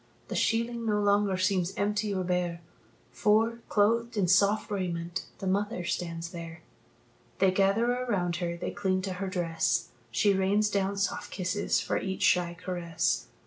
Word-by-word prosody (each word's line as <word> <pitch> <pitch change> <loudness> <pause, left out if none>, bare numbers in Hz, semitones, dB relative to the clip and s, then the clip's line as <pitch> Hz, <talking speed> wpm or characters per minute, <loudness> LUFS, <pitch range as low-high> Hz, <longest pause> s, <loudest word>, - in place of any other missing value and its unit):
The - - -3
sheeling 230 +1 0
no 210 -1 +2
longer 205 -1 +2
seems 185 0 +1
empty 210 +1 0
or 190 -2 -1
bare, 175 -1 -1 0.5
For, 225 - +2
clothed 230 +2 +2
in 190 -3 +2
soft 200 +4 +3
raiment, 175 -3 -3
the - - -6
mother 200 0 0
stands 170 -1 -3
there. 165 -1 -8 0.7
They 190 -1 +4
gather 195 +4 +3
around 205 -9 -1
her, 170 -1 -3
they - - -4
cling 190 -2 -1
to 190 -1 -2
her 195 - -1
dress; 170 -2 0 0.2
She 195 - +3
rains 200 +2 +2
down 200 0 0
soft 195 -1 -1
kisses 190 +3 0
for - - -1
each 190 -1 -3
shy 175 -1 +2
caress. 175 -2 -1
190 Hz, 155 wpm, -29 LUFS, 175-205 Hz, 0.7 s, They